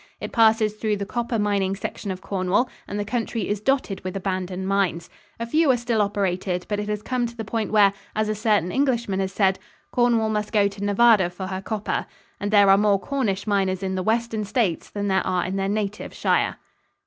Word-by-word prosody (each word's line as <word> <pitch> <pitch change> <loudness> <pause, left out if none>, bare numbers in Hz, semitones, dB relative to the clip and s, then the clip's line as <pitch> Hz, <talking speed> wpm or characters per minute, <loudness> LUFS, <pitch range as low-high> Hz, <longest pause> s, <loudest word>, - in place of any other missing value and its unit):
It - - -6
passes 220 -2 +4
through 215 -1 -1
the 200 - -3
copper 235 +2 -2
mining 200 -2 +1
section 200 +1 -5
of 185 -1 -4
Cornwall 190 +6 0 0.2
and 205 - -4
the 205 - -2
country 230 -1 -2
is 205 0 -2
dotted 260 -5 0
with 185 +1 -4
abandoned 185 -1 -3
mines. 190 -4 0 0.3
A 230 - -2
few 310 +6 +2
are 255 - +5
still 235 -2 0
operated, 190 -3 -1
but 205 -1 -2
it 210 0 -4
has 210 0 -2
come 250 -2 -1
to 235 0 -12
the 225 - -4
point 220 0 -2
where, 205 -2 +5 0.2
as 215 0 +1
a 215 - 0
certain 210 -5 +1
Englishman 235 -8 0
has 190 -1 -1
said, 190 -1 +2 0.3
"Cornwall 235 -3 +2
must 210 -1 -2
go 205 -3 +4
to 200 0 -7
Nevada 205 -2 +4
for 180 +2 -7
her 190 0 -4
copper," 210 +1 -3 0.3
and 205 - -2
there 205 -2 +6
are 195 - +6
more 205 -1 +3
Cornish 215 -7 -2
miners 195 -2 0
in 190 0 -1
the 185 - -1
western 225 +1 0
states 205 -5 -1
than 205 0 -3
there 190 -1 +2
are 180 -1 0
in 185 +2 -3
their 195 0 -1
native 210 0 -3
shire. - - +1
205 Hz, 215 wpm, -24 LUFS, 195-225 Hz, 0.3 s, there